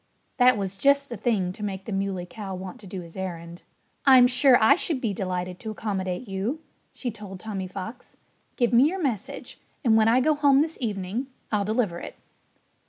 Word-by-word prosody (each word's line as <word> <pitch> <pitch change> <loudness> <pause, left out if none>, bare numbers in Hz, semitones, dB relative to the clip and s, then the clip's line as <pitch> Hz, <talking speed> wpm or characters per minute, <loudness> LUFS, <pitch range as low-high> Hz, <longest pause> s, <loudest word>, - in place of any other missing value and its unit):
That 250 -2 +5
was 195 -1 -4
just 280 +4 +3
the 240 - -5
thing 200 -5 0
to 210 - -12
make 195 -2 -4
the - - -6
Muley 195 -2 -2
Cow 195 0 -7
want 185 0 -8
to 205 - -12
do 185 0 -6
his 170 -1 -13
errand. 170 -2 -6 0.4
"I'm 260 -3 +8
sure 250 +1 +5
I 220 - +6
should 325 -6 0
be 225 -5 -1
delighted 180 -1 -3
to 220 - -6
accommodate 195 -1 -3
you," 200 +10 -2 0.3
she 245 - -4
told 205 -3 -9
Tommy 195 -2 -4
Fox. 195 +6 -8 0.4
"Give 240 -1 +1
me 240 +3 +7
your 370 +5 -2
message. 245 - -4 0.3
And 225 -2 +5
when 220 0 +5
I 235 +3 +5
go 310 +4 +3
home 285 -1 +4
this 320 0 -5
evening 210 +2 -3 0.2
I'll 205 -2 +1
deliver 210 -5 0
it." - - -8
210 Hz, 195 wpm, -25 LUFS, 190-250 Hz, 0.4 s, I'm